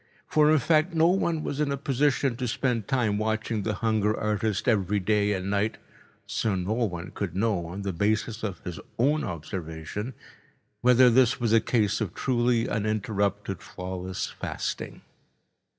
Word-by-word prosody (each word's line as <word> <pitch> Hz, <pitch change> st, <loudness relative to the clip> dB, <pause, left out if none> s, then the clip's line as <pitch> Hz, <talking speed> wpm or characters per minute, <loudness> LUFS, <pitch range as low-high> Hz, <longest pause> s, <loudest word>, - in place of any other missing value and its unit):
For, 150 Hz, -1 st, +4 dB
in 155 Hz, -, +5 dB
fact, 155 Hz, +5 st, +2 dB
no 165 Hz, +1 st, +5 dB
one 170 Hz, -4 st, +1 dB
was 145 Hz, -, -3 dB
in 150 Hz, -2 st, +1 dB
a 140 Hz, -, -1 dB
position 135 Hz, -1 st, +1 dB
to 125 Hz, -1 st, -2 dB
spend 115 Hz, -3 st, -1 dB
time 115 Hz, -6 st, +1 dB
watching 110 Hz, 0 st, -1 dB
the 105 Hz, +1 st, -1 dB
hunger 110 Hz, -1 st, +2 dB
artist 105 Hz, +2 st, -1 dB
every 105 Hz, -3 st, +2 dB
day 105 Hz, +1 st, +2 dB
and 95 Hz, 0 st, -3 dB
night, 100 Hz, +2 st, 0 dB, 0.5 s
so 110 Hz, -3 st, -1 dB
no 95 Hz, +3 st, -1 dB
one 90 Hz, -7 st, -2 dB
could 95 Hz, -4 st, -4 dB
know, 100 Hz, -4 st, 0 dB
on 95 Hz, +4 st, -6 dB
the 100 Hz, -1 st, -2 dB
basis 105 Hz, +4 st, 0 dB
of 100 Hz, -4 st, -4 dB
his 90 Hz, -3 st, -6 dB, 0.2 s
own 145 Hz, +6 st, +2 dB
observation, 85 Hz, +6 st, -5 dB, 0.7 s
whether 125 Hz, 0 st, +6 dB
this 125 Hz, +1 st, +4 dB
was 115 Hz, -2 st, +1 dB
a 115 Hz, -, +6 dB
case 110 Hz, -2 st, +1 dB
of 95 Hz, -5 st, -3 dB
truly 120 Hz, -2 st, +1 dB
uninterrupted, 100 Hz, -2 st, -1 dB
flawless 90 Hz, 0 st, -5 dB
fasting. -, -, -5 dB
110 Hz, 160 wpm, -27 LUFS, 100-125 Hz, 0.7 s, whether